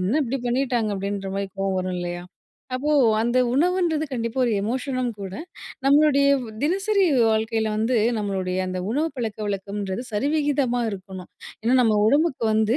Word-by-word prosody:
என்ன 190 Hz, +8 st, 0 dB
இப்பிடி 270 Hz, +1 st, -2 dB
பண்ணிட்டாங்க 240 Hz, -3 st, 0 dB
அப்பிடின்றமாரி 195 Hz, 0 st, -3 dB
கோவம் 195 Hz, 0 st, 0 dB
வரும் 185 Hz, 0 st, -2 dB
இல்லயா! 175 Hz, 0 st, -4 dB, 0.5 s
அப்போ 295 Hz, +4 st, 0 dB, 0.3 s
அந்த 240 Hz, +2 st, +1 dB, 0.2 s
உணவுன்றது 335 Hz, 0 st, +1 dB
கண்டிப்பா 230 Hz, 0 st, -3 dB
ஒரு 235 Hz, -, +1 dB
எமோஷனும் 255 Hz, +2 st, -2 dB
கூட. 190 Hz, -1 st, -6 dB, 0.5 s
நம்மளுடைய 280 Hz, 0 st, +5 dB, 0.3 s
தினசரி 390 Hz, +5 st, +2 dB, 0.3 s
வாழ்க்கையில 220 Hz, 0 st, 0 dB
வந்து 225 Hz, +3 st, +1 dB, 0.2 s
நம்மளுடைய 190 Hz, -3 st, -2 dB
அந்த 185 Hz, 0 st, -3 dB
உணவு 300 Hz, +7 st, 0 dB
பழக்கவழக்கம்ன்றது 205 Hz, -2 st, -3 dB
சரிவிகிதமா 280 Hz, 0 st, +1 dB
இருக்கணும். 185 Hz, -2 st, -8 dB, 0.3 s
ஏன்னா 235 Hz, +3 st, +2 dB
நம்ம 220 Hz, -3 st, +3 dB
உடம்புக்கு 285 Hz, -1 st, +2 dB
வந்து 220 Hz, +3 st, +2 dB
230 Hz, 130 wpm, -23 LUFS, 200-275 Hz, 0.5 s, நம்மளுடைய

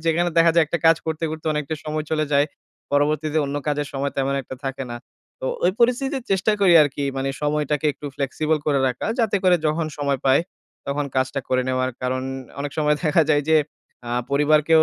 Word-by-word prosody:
যেখানে 170 Hz, +2 st, +2 dB
দেখা 165 Hz, 0 st, +6 dB
যায় 170 Hz, -1 st, +5 dB
একটা 170 Hz, +3 st, -2 dB
কাজ 165 Hz, -, +6 dB
করতে, 160 Hz, 0 st, -2 dB
করতে 160 Hz, 0 st, -7 dB
অনেকটা 150 Hz, +1 st, -2 dB
সময় 155 Hz, 0 st, -3 dB
চলে 155 Hz, -1 st, +1 dB
যায়। 140 Hz, +1 st, +4 dB, 0.5 s
পরবর্তীতে 150 Hz, +2 st, +1 dB
অন্য 140 Hz, +1 st, -3 dB
কাজের 145 Hz, -1 st, -1 dB
সময় 140 Hz, 0 st, -2 dB
তেমন 135 Hz, 0 st, 0 dB
একটা 130 Hz, -, -8 dB
থাকে 135 Hz, 0 st, -3 dB
না। 120 Hz, -, -4 dB, 0.4 s
তো -, -, -3 dB, 0.2 s
ওই 180 Hz, -, +4 dB
পরিস্থিতিতে 265 Hz, +4 st, +2 dB
চেষ্টা 195 Hz, +3 st, +2 dB
করি 185 Hz, -3 st, +5 dB
আরকি 145 Hz, -1 st, -2 dB
মানে 135 Hz, +1 st, -1 dB
সময়টাকে 150 Hz, 0 st, 0 dB
একটু 145 Hz, -, -9 dB
ফ্লেক্সিবল 150 Hz, +3 st, 0 dB
করে 145 Hz, -2 st, +2 dB
রাখা। 125 Hz, 0 st, -4 dB
যাতে 220 Hz, -4 st, +2 dB
করে 180 Hz, -1 st, +6 dB
যখন 155 Hz, +1 st, 0 dB
সময় 140 Hz, -1 st, 0 dB
পাই, 135 Hz, +1 st, +5 dB, 0.5 s
তখন 145 Hz, +1 st, -1 dB
কাজটা 130 Hz, +1 st, 0 dB
করে 130 Hz, 0 st, +2 dB
নেওয়ার। 130 Hz, 0 st, 0 dB
কারণ 130 Hz, 0 st, -1 dB, 0.4 s
অনেক 145 Hz, -1 st, -4 dB
সময় 150 Hz, -1 st, +2 dB
দেখা 160 Hz, +1 st, +4 dB
যায় 145 Hz, -1 st, +3 dB
যে 160 Hz, -, +5 dB, 0.5 s
আ 120 Hz, -, -5 dB, 0.2 s
পরিবারকেও 155 Hz, +2 st, +4 dB
150 Hz, 195 wpm, -22 LUFS, 140-160 Hz, 0.5 s, দেখা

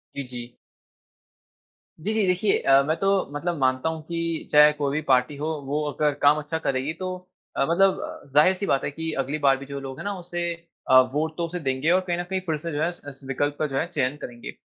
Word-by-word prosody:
जी, 140 Hz, -, -3 dB
जी। 120 Hz, -1 st, -9 dB, 1.5 s
जी, 210 Hz, +7 st, -1 dB
जी, 220 Hz, -2 st, +2 dB
देखिये 185 Hz, +3 st, +2 dB
अ, 135 Hz, 0 st, +5 dB
मैं 155 Hz, +3 st, 0 dB
तो 195 Hz, -, 0 dB, 0.3 s
मतलब 170 Hz, +3 st, -2 dB
मानता 130 Hz, +3 st, +1 dB
हूँ 160 Hz, -1 st, -5 dB
की 165 Hz, 0 st, -3 dB
चाहे 150 Hz, 0 st, +8 dB
कोई 145 Hz, -2 st, -1 dB
भी 155 Hz, -, 0 dB
पार्टी 130 Hz, +2 st, +3 dB
हो, 150 Hz, +2 st, -3 dB, 0.2 s
वो 150 Hz, +2 st, -1 dB
अगर 150 Hz, 0 st, +1 dB
काम 145 Hz, +1 st, +6 dB
अच्छा 150 Hz, +2 st, -3 dB
करेगी, 135 Hz, +1 st, -1 dB
तो 185 Hz, +2 st, -4 dB, 0.4 s
अ, -, -, +3 dB
मतलब 190 Hz, -4 st, +1 dB
ज़ाहिर-सी 185 Hz, +6 st, +4 dB
बात 135 Hz, -7 st, +1 dB
है -, -, -2 dB
कि 160 Hz, +2 st, -4 dB
अगली 145 Hz, +4 st, -3 dB
बार 135 Hz, -2 st, +4 dB
भी 140 Hz, -, -9 dB
जो 140 Hz, 0 st, -6 dB
लोग 135 Hz, -1 st, -7 dB
है -, -, -6 dB
ना, 205 Hz, -, -1 dB
उसे 175 Hz, 0 st, -3 dB, 0.4 s
अ, 130 Hz, -, +9 dB
वोट 155 Hz, +2 st, -1 dB
तो 170 Hz, -, 0 dB
उसे 175 Hz, +2 st, -5 dB
देंगे 135 Hz, +3 st, 0 dB
और 185 Hz, -, +4 dB
कहीं 175 Hz, 0 st, 0 dB
न -, -, -1 dB
कहीं 190 Hz, -, 0 dB
फिर 160 Hz, -3 st, -1 dB
से 165 Hz, +2 st, -5 dB
जो 145 Hz, +1 st, -2 dB
है, 165 Hz, -, +2 dB
उस 175 Hz, -, -11 dB
उस 135 Hz, 0 st, -14 dB
विकल्प 145 Hz, +2 st, -1 dB
का 155 Hz, -, +1 dB
जो 135 Hz, -, -3 dB
है 160 Hz, -, +1 dB
चयन 140 Hz, -5 st, -1 dB
करेंगे। 120 Hz, -1 st, -7 dB
150 Hz, 235 wpm, -25 LUFS, 135-170 Hz, 1.5 s, अ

